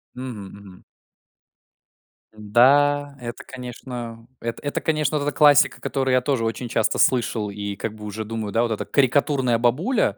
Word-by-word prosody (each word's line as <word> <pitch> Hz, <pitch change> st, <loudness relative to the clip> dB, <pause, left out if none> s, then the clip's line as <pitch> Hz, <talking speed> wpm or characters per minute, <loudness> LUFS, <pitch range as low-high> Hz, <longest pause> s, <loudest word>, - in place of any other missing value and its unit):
Мгм, 125 Hz, -5 st, -7 dB
мгм. 100 Hz, -2 st, -14 dB, 1.5 s
Да, 140 Hz, +7 st, +3 dB
это, 120 Hz, -1 st, -7 dB
конечно, 120 Hz, -2 st, -8 dB
это 115 Hz, 0 st, -5 dB
это 145 Hz, -, -2 dB
конечно, 155 Hz, -2 st, 0 dB
вот 145 Hz, -, -3 dB
эта 145 Hz, -, -2 dB
классика, 145 Hz, -3 st, +5 dB
которую 135 Hz, -2 st, -1 dB
я 125 Hz, -, +3 dB
тоже 130 Hz, -4 st, 0 dB
очень 115 Hz, +2 st, -3 dB
часто 115 Hz, -2 st, 0 dB
слышал 115 Hz, -4 st, +1 dB
и 100 Hz, 0 st, -5 dB
как 110 Hz, +2 st, -4 dB
бы 105 Hz, -1 st, -10 dB
уже 105 Hz, +1 st, -5 dB
думаю, 110 Hz, -1 st, -4 dB
да, 115 Hz, +3 st, +2 dB
вот 115 Hz, -, -1 dB
эта 110 Hz, -, -3 dB
карикатурная 130 Hz, -2 st, +2 dB
бабуля. 160 Hz, -, +1 dB
120 Hz, 160 wpm, -23 LUFS, 110-140 Hz, 1.5 s, классика